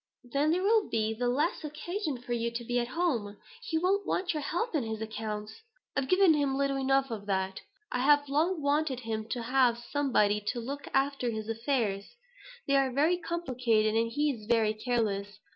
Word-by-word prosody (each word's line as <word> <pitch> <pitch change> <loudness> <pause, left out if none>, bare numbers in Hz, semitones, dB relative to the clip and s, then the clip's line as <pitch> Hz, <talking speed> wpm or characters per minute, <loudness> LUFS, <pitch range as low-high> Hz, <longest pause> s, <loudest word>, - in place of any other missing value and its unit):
"Then 275 +5 0
there 355 +3 +1
will 435 +1 +3
be 220 0 0
the 245 +2 -1
less 290 +9 0
occasion 305 +1 -3
for 240 0 -4
you 235 0 0
to 235 0 -3
be 245 +1 0
at 240 - -1
home. 245 -9 -1 0.2
He 320 - -2
won't 380 +4 +2
want 365 -1 -1
your 305 - -2
help 350 +10 -2
in 305 - +2
his 220 -1 -4
accounts." 215 - -5 0.3
"I've 270 - 0
given 370 -3 +6
him 280 -3 +1
little 275 0 +1
enough 270 -1 +2
of 210 -2 -5
that. 190 -1 -1 0.3
I 250 - -1
have 290 +2 +4
long 310 +4 +1
wanted 285 -3 +1
him 220 -1 -4
to 240 0 -2
have 250 -1 +3
somebody 240 -5 +1
to 245 - -1
look 275 +5 -6
after 270 -2 +1
his 220 -2 -4
affairs. 225 - -1 0.5
They 275 - +3
are 270 -1 +2
very 305 +7 +2
complicated 250 -11 0
and 230 +1 +1
he 295 +3 +1
is 215 -5 -9
very 225 -2 +3
careless. 215 -3 -1
255 Hz, 195 wpm, -30 LUFS, 225-295 Hz, 0.5 s, given